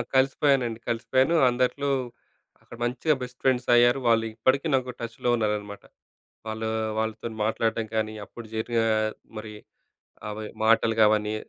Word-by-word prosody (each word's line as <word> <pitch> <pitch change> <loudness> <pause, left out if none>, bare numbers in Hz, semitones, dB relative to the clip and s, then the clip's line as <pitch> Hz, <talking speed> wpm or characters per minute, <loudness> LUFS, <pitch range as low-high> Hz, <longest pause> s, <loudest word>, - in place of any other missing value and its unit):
కలిసిపోయానండి, 130 -3 +2
కలిసిపోయాను. 130 +6 +1
అందరిలో, 130 +3 0 0.7
అక్కడ 120 - -13
మంచిగా 125 +6 +1
బెస్ట్ 125 0 -7
ఫ్రెండ్సయ్యారు. 125 0 +4
వాళ్ళు 115 -1 +3
ఇప్పటికి 130 +7 +1
నాకు 130 -1 +1
టచ్‌లో 115 +1 -3
ఉన్నారనమాట. 105 -2 -2 0.6
వాళ్ళు, 110 0 -3 0.3
వాళ్ళతోని 110 +1 -3
మాట్లాడటం 115 0 0
కానీ, 110 0 -1
అప్పుడు 115 +1 -11
జరిగిన 115 +1 0 0.6
మరి, 110 0 -7 0.8
అవి 105 +1 -5 0.2
మాటలు 115 0 +4
గావన్ని, 105 0 +3
115 Hz, 115 wpm, -26 LUFS, 110-125 Hz, 0.8 s, ఫ్రెండ్సయ్యారు